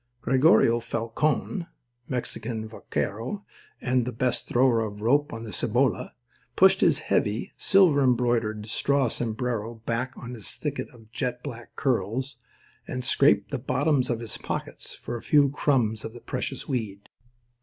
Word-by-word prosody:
Gregorio 125 -3 +5
Falcon, 115 - -1 0.4
Mexican 120 -3 -3
vaquero 115 - -4 0.3
and 125 -2 0
best 125 0 +1
thrower 125 -1 +3
of 105 -2 -3
the 105 - -9
rope 145 +5 +3
on 115 0 -6
the 110 - -7
Cibolo, 120 +2 +1 0.5
pushed - - +5
his - - +4
heavy, 105 +3 0
silver 180 -7 +4
embroidered 120 -4 +1
straw 135 +4 +1
sombrero 115 0 -2
back 125 +3 -2
upon 125 0 -8
his 110 -4 -4
thicket 145 -2 -4
of 115 -3 -18
jet 125 +1 -3
black 120 -5 -8
curls, 125 +1 -1 0.5
and 125 0 -4
scraped 140 +4 +3
the 140 - -2
bottoms 135 +1 +1
of 120 -1 -1
his 115 - -4
pockets - - -4
for 120 - -5
a - - -9
few 145 -2 +4
crumbs 120 -7 +1
of 110 - -6
the 120 - -10
precious - - -4
weed. 105 -6 -3
120 Hz, 145 wpm, -26 LUFS, 115-135 Hz, 0.5 s, Gregorio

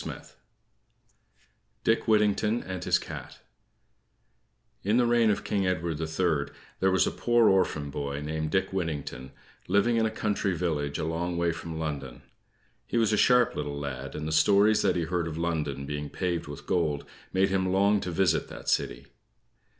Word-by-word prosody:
DICK 115 +2 +1
WHITTINGTON 105 +1 +2
AND 95 -2 -5
HIS - - +4
CAT - - -8 1.5
In 105 +4 +2
the 125 - +4
reign 120 -1 +4
of 105 -1 0
King 100 -2 0
Edward 85 -3 -1
the 80 - -2
Third 80 -3 0 0.3
there 95 - +3
was 95 0 +3
a - - -1
poor 120 -2 +3
orphan 85 -7 +1
boy, 70 0 -3
named 80 +1 -3
Dick 95 +2 0
Whittington, 75 -8 -3 0.4
living 100 +5 +3
in 110 -1 +3
a - - -1
country 105 -3 -1
village 75 -5 -1
a - - -2
long 85 +2 -2
way 85 0 +1
from 80 0 -6
London. 70 -6 -5 0.6
He - - -1
was 110 -2 +3
a - - +5
sharp 125 +2 +4
little 70 0 -3
lad, 70 -1 -5
and 75 0 -4
the - - -3
stories 100 +6 +4
that - - +2
he 85 - 0
heard 85 0 -1
of 80 -1 -5
London 75 -5 -2
being 75 +1 -4
paved 90 -4 -2
with 75 -1 -9
gold 80 -6 0 0.3
made 95 +1 +2
him 95 -1 0
long 100 +2 +3
to 90 - -4
visit 85 -1 +1
that - - -7
city. - - 0
85 Hz, 175 wpm, -28 LUFS, 75-100 Hz, 1.5 s, a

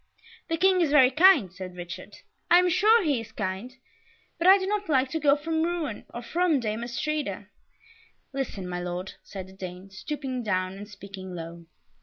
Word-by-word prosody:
"The 330 - -1
King 370 +1 +4
is 325 - +2
very 265 -3 +6
kind," 300 - +5
said 185 -1 -8
Richard. 175 -1 -8 0.3
"I 350 - +8
am 360 0 +4
sure 430 +5 +5
he 285 -8 +1
is 225 0 -11
kind; 210 +4 -4 0.6
but 340 - +2
I 385 +1 +9
do 380 - -3
not 410 -1 -2
like 265 -3 +2
to 320 - -1
go 285 -2 +4
from 320 +2 -2
Rouen, 325 -8 -2
or 240 - -7
from 335 +1 +1
Dame 220 -1 -3
Astrida." 295 +5 -3 0.8
"Listen, 245 -9 -4
my 180 0 -3
Lord," 180 +1 -4
said 190 -2 -8
the 190 - -15
Dane, 185 0 -8
stooping 260 +4 -4
down 185 -4 -1
and 205 +2 -9
speaking 195 -2 -9
low. 170 0 -8
250 Hz, 185 wpm, -27 LUFS, -, 0.8 s, I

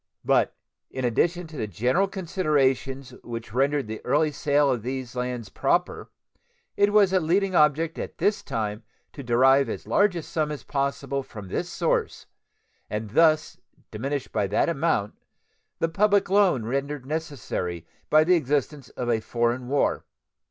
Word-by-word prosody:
But - - +2 0.3
in 130 -1 -3
addition 175 +9 +1
to 155 -2 -11
the 110 - -2
general 125 - +1
considerations 140 -8 -1
which 115 -2 -7
rendered 140 +2 +1
the 110 0 -7
early 150 +4 +2
sale 145 -1 +2
of 120 -3 -1
these 130 +1 -5
lands 125 -4 -3
proper, - - -1 0.7
it 205 0 +3
was 205 -3 +4
a 185 - +4
leading 185 +4 +1
object 155 0 +2
at - - -6
this 205 +5 +1
time 110 -4 -3 0.3
to 140 - -8
derive 130 +2 +4
as - - -5
large 205 -2 +2
a 170 - -4
sum 155 -1 -2
as 150 - -6
possible 140 -1 -2
from 105 -7 -10
this - - -3
source, - - -1 0.6
and 105 -1 -4
thus 155 +3 +3 0.3
diminish 135 +5 -3
by 100 - -1
that 105 - +1
amount 150 -10 0 0.6
the 165 - +1
public 200 +3 +2
loan 190 - +3
rendered 140 +2 -3
necessary 135 - -4 0.2
by 155 0 +6
the 180 +3 +3
existence 145 -2 -1
of 125 - -5
a 115 -2 +2
foreign 120 +2 -1
war. 140 +2 +1
140 Hz, 155 wpm, -25 LUFS, 120-165 Hz, 0.7 s, by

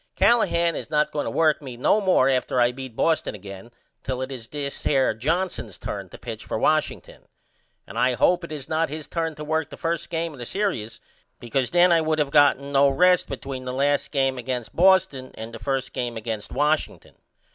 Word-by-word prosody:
Callahan 170 -8 +3
is - - -6
not 150 0 +1
going 145 - -2
to - - -2
work 155 -2 +2
me 130 -4 -8
no 210 - +3
more 185 -9 +3
after 130 -1 +1
I 120 0 +4
beat 130 -2 -8
Boston 160 -6 0
again 100 +2 -10 0.3
till 130 -1 -3
it 130 - -6
is 120 -4 -7
this 140 0 -5
here 135 -5 +2
Johnson's 165 - -2
turn - - -6
to - - -11
pitch - - -7
for - - -3
Washington. - - -1 0.6
And - - -6
I 125 0 +3
hope 175 +7 +3
it 170 - -8
is 145 -3 -6
not 160 +1 0
his 155 +1 -6
turn 165 0 -3
to 150 - -7
work 160 0 -1
the - - -10
1st 165 -1 -2
game 165 -1 -2
of 140 - -13
the 120 - -5
serious 190 - -2 0.4
because 120 +1 -1
then 175 +1 +5
I 165 -1 +5
would 155 0 0 0.2
not 145 -1 +6
have 140 - -11
no 140 0 +4
rest 180 +5 +3
between 135 -1 -6
the 125 - -4
last 140 +2 +1
game 135 -2 0
against 125 -2 -4
Boston 170 -8 +3
and 110 +1 -8
the 115 - -8
1st 135 +3 -2
game 120 -2 -3
against 110 -1 -5
Washington. 150 +3 -1
140 Hz, 210 wpm, -24 LUFS, 125-165 Hz, 0.6 s, not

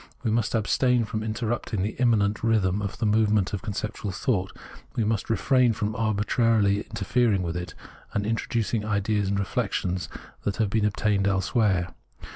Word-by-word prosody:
We 115 - +1
must 115 0 0
abstain 120 +2 +2
from 110 0 -3
interrupting 110 -2 -2
the 105 - -2
immanent 110 -4 +2
rhythm 105 -4 +2
of 100 -1 -4
the - - -1
move 105 0 +3
ment 105 -3 +1
of 100 - -2
conceptual 105 -1 -4
thought; 95 -2 -1 0.4
we 115 - +1
must 110 0 -1
refrain 125 +1 +3
from 105 +1 -2
arbitrarily 110 -1 +2
interfering 115 -5 0
with 85 -1 -3
it, 90 0 -5 0.4
and 105 - -1
introducing 115 0 -1
ideas 105 -1 0
and 100 - 0
reflections 95 -3 -1 0.3
that 100 - -2
have 110 -4 0
been 110 -1 +2
obtained 100 -1 +1
elsewhere. 95 -2 +1
105 Hz, 160 wpm, -26 LUFS, 100-115 Hz, 0.4 s, move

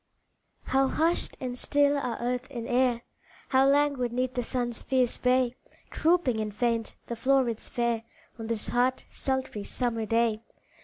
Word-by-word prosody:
How 270 0 +2
hushed 330 +5 0
and 250 -1 -4
still 285 +2 +3
are 250 -5 -2
earth 250 +1 -2
and 235 -4 -6
air, 245 -1 +2 0.5
How 265 0 +4
languid 280 -3 +2
'neath 255 +1 -1
the 245 - -1
sun's 240 -1 -2
fierce 255 -2 +1
ray 250 -1 +3 0.4
Drooping 320 -9 +2
and 215 -1 -2
faint 230 +2 -1
the 235 - -4
flowrets 250 -1 +1
fair, 235 -2 0 0.4
On 225 - -5
this 225 -2 -2
hot, 250 +2 +1
sultry, 265 -6 -2
summer 230 -1 -2
day! 225 0 +1
245 Hz, 150 wpm, -28 LUFS, 235-265 Hz, 0.5 s, How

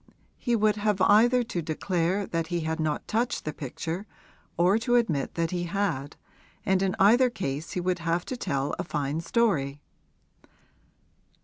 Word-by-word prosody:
He 240 -2 +1
would 215 -1 +2
have 205 -1 0
either 240 +6 +5
to 185 -7 -3
declare 175 +4 -1
that 165 -2 -2
he 175 -1 -2
had 160 +1 -2
not 155 -1 -1
touched 230 +3 -1
the 155 - -3
picture 165 - -5 0.5
or 180 +6 +4
to 240 +1 +1
admit 175 - +1
that 165 -1 0
he 175 -1 -2
had, 170 -7 -2 0.5
and 190 0 +2
in 190 -1 0
either 240 +6 +5
case 160 - -4
he - - -1
would 180 0 0
have 170 +1 -1
to 255 - -4
tell 140 - -2
a - - 0
fine 150 -1 -2
story. 165 - +1
180 Hz, 165 wpm, -27 LUFS, 160-210 Hz, 0.5 s, either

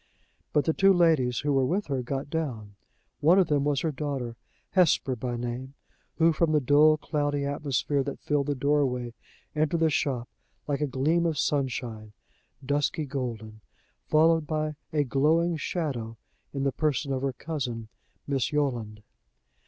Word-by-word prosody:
But 150 - +2
the 160 - +2
two 195 +3 +5
ladies 160 -9 +3
who 145 0 0
were 135 -1 +3
with 185 +10 0
her 135 -3 -2
got 135 +3 -4
down. 120 -11 -3 0.5
One 165 +5 +5
of 190 -4 +4
them 145 -2 +2
was 145 -1 +1
her 160 - 0
daughter, 135 -5 -4 0.4
Hesper 165 -7 +3
by 120 0 -3
name, 120 +3 -5 0.4
who, 165 0 +4
from 160 0 +1
the 150 - +5
dull, 150 +3 +5
cloudy 145 -2 -1
atmosphere 140 -1 0
that 140 - -5
filled 145 -1 0
the 145 - 0
doorway, 130 -3 0 0.4
entered 155 +2 +1
the 160 -1 +3
shop 130 -5 -1 0.4
like 145 -1 -1
a 150 - +1
gleam 155 +6 +1
of 160 -2 -1
sunshine, 125 -6 -2 0.5
dusky 145 +2 0
golden, 115 -6 -5 0.5
followed 160 0 +4
by 155 -1 -1 0.2
a 150 -2 +2
glowing 155 +6 +2
shadow, 135 -9 -3 0.3
in 135 -1 -3
the 140 - +2
person 140 -1 -1
of 130 - -2
her 135 -1 -1
cousin, 125 -5 -4 0.4
Miss 135 -4 -1
Yolland. 120 -8 -2
140 Hz, 160 wpm, -27 LUFS, 125-155 Hz, 0.5 s, two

